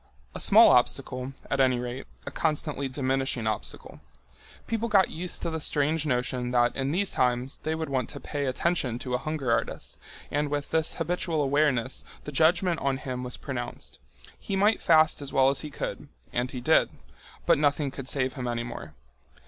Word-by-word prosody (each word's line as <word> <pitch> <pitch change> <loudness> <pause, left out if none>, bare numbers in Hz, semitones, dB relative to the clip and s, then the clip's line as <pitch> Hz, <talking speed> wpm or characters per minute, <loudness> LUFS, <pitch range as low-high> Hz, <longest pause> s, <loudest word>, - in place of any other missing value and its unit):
A - - -6
small - - +7
obstacle, 130 +1 +1
at 135 - -1
any 130 -2 +4
rate, 125 +2 -5 0.2
a - - -5
constantly 150 -3 -1
diminishing 130 -2 -1
obstacle. 110 -1 -4 0.7
People 230 0 -2
got 195 -3 +4
used 175 +2 -3
to 170 - -1
the 160 - -2
strange 150 +1 +1
notion 125 -1 -1
that 120 -1 +2
in 135 0 -1
these 190 +4 0
times 125 +1 0
they 155 +1 -2
would 160 0 -3
want 130 -4 -1
to - - -7
pay 145 -1 -3
attention 130 -3 0
to 125 0 -5
a 125 - +1
hunger 150 -5 -2
artist, - - -2 0.3
and 145 0 0
with 145 -1 -3
this 160 -1 +1
habitual 170 -3 -1
awareness 135 -3 +1 0.2
the 150 - -6
judgment 170 +4 +3
on 135 -1 0
him 130 -3 -5
was 125 -1 -5
pronounced. - - -6 0.4
He 195 - -3
might 205 +3 +3
fast 155 -2 +4
as 140 - -6
well 135 0 +4
as 140 - +1
he 150 - -6
could—and 125 -3 -5
he 125 - -6
did—but 65 - 0
nothing 145 -1 +1
could 135 0 -6
save 130 -2 0
him 125 -3 -4
any 120 -1 -1
more. 120 - -8
140 Hz, 180 wpm, -27 LUFS, 125-155 Hz, 0.7 s, small